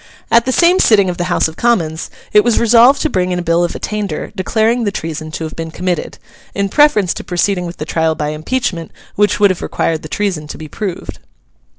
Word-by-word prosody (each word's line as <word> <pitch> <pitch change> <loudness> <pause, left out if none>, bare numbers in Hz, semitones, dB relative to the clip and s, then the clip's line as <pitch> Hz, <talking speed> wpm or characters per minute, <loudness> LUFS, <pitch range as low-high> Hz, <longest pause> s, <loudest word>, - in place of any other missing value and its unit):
At 235 0 +5
the 260 - 0
same 350 +6 +4
sitting 200 -4 +4
of 175 - -7
the 175 - -2
House 175 - +1
of 160 - -11
Commons 170 -10 0 0.2
it 210 0 +6
was 240 -2 +2
resolved 240 +4 +5
to - - +2
bring 185 -5 0
in 180 - -1
a 175 - -3
bill 170 0 +2
of 175 - -2
attainder 205 -7 -4
declaring 220 +4 +1
the 205 - 0
treason 155 -3 -5
to 165 - -4
have 160 - -6
been 165 0 -5
committed: 180 +1 -3 0.4
in 200 0 -1
preference 215 - +3
to - - -7
proceeding 180 0 -1
with 170 - -8
the 150 - -5
trial 160 0 0
by 150 -1 -2
impeachment, 165 +2 -3 0.2
which 205 0 +1
would 205 -2 +5
have 185 - -5
required 160 -1 -1
the 155 - -9
treason 180 -7 -2
to - - -8
be 155 - -8
proved. 190 +3 -6
185 Hz, 225 wpm, -16 LUFS, 165-215 Hz, 0.4 s, it